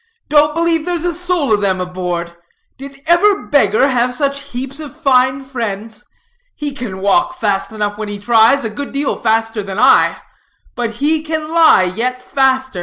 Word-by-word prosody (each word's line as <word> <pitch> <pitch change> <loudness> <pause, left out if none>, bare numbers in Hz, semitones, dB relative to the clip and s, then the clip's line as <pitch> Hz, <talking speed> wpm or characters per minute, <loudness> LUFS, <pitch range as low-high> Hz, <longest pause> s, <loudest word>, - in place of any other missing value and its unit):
"Don't 300 0 +3
believe 335 -1 +2
there's 350 -1 -2
a 350 - 0
soul 350 -7 0
of 205 - +1
them 190 -2 0
aboard. 180 -2 -4 0.4
Did 275 0 -11
ever 385 +5 +3
beggar 265 -1 +2
have 250 -1 0
such 280 0 -2
heaps 265 +2 -5
of 300 0 -10
fine 260 -2 +2
friends? 225 -4 -6 0.5
He 295 -1 -5
can 220 -8 -7
walk 345 - +1
fast 200 -2 -1
enough 210 -1 -3
when 215 - -4
he 205 - -5
tries, 225 +5 +3
a 220 - -3
good 280 +6 -7
deal 280 0 -1
faster 225 -1 0
than 195 -1 -7
I; 255 +4 +4 0.6
but 240 -2 -3 0.2
he 310 +1 +1
can 315 0 -4
lie 325 - +5
yet 255 +2 -2
faster. 260 -4 0
260 Hz, 175 wpm, -16 LUFS, 215-300 Hz, 0.6 s, lie